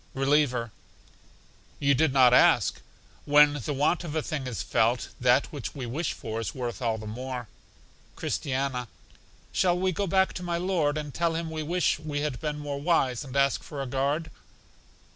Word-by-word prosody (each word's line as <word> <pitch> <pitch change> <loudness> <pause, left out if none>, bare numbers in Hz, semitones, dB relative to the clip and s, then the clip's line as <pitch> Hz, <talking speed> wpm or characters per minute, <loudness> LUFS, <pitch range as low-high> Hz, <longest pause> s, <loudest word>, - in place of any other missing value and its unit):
Reliever: 135 -4 +1 1.1
You 140 0 +3
did 150 +2 +2
not 130 -2 +6
ask. - - +4 0.4
When 145 -1 +5
the - - -3
want 150 +5 +1
of 160 -2 -5
a 155 - 0
thing 145 -5 -4
is 120 -4 -4
felt, 115 +2 +1
that 125 +2 +4
which 140 -2 -6
we 135 -3 -5
wish 145 +9 -2
for 110 0 -5
is 115 - -4
worth 120 -2 -4
all 115 -2 0
the 110 - -8
more. 125 +2 -5 0.7
Christiana: 130 -2 -2 0.6
Shall 180 -2 +2
we 185 +1 +1
go 200 +3 -2
back 190 +1 +2
to - - -6
my 175 -1 -2
Lord 170 -5 0
and 150 -2 -5
tell 170 -1 0
Him 165 -1 -3
we 160 -1 -3
wish 170 +1 +1
we 150 -2 -3
had 145 -4 -3
been 150 -1 -2
more 145 -1 -5
wise, 145 -6 +1
and 135 -1 -9
ask 140 0 +2
for 145 - -8
a 135 - -2
guard? 140 +5 -1
145 Hz, 180 wpm, -27 LUFS, 125-160 Hz, 1.1 s, not